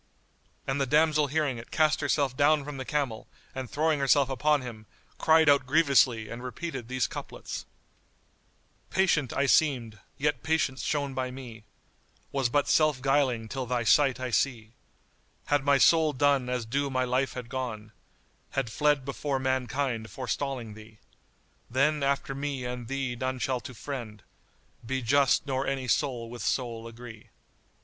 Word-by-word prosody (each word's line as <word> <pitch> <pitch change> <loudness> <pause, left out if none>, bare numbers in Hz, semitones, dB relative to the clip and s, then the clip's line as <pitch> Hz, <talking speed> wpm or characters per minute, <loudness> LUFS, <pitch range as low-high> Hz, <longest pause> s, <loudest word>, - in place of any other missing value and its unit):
and 135 +1 -1
the 135 - +1
damsel 150 +1 +3
hearing 140 -4 -1
it 115 - -11
cast 155 -1 +2
herself 140 -2 +1
down 145 +1 +3
from 145 -1 -6
the 130 - -5
camel 140 -7 -2 0.3
and 130 -2 -5
throwing 155 0 +1
herself 140 0 +3
upon 150 +2 +2
him, 110 -4 -9 0.3
cried 160 0 +5
out 140 -2 +4
grievously 135 -7 +3
and 115 +2 -7
repeated 130 -1 -5
these 130 0 0
couplets, - - -7 1.2
"Patient 170 -9 +2
I 140 - +1
seemed, 125 -7 +2 0.2
yet 150 +1 0
Patience 150 -5 0
shown 140 -2 -1
by 130 0 -2
me 120 -4 -10 0.3
* - - -37
Was 135 -3 0
but 145 +3 +1
self 155 -4 +3
guiling 130 -4 +1
till 130 +1 -4
thy 120 -1 0
sight 135 +2 +4
I 130 -1 -3
see: 115 -1 0 0.7
Had 145 -1 +1
my 140 0 +4
soul 160 +1 +4
done 140 -2 +2
as 125 -2 -2
due 140 +5 -1
my 130 -1 0
life 130 +2 0
had 125 -2 -6
gone, 115 -4 -5 0.3
* - - -39
Had 125 -4 0
fled 145 +1 +2
before 140 0 -2
mankind 130 -3 -1
forestalling 130 -2 -4
thee: 110 0 -14 0.7
Then, 145 +4 +2
after 140 0 0
me 140 -2 -4
and 125 -1 -5
thee 135 -1 -2
none 130 +1 -2
shall 125 +1 -1
to 125 - -10
friend 115 -5 -7 0.3
* - - -37
Be 130 +2 -3
just, 140 +3 +3
nor 135 -1 -1
any 135 -2 -2
soul 125 -3 0
with 120 +1 -8
soul 115 -3 -2
agree." 115 -1 -11
130 Hz, 165 wpm, -28 LUFS, 120-145 Hz, 1.2 s, cried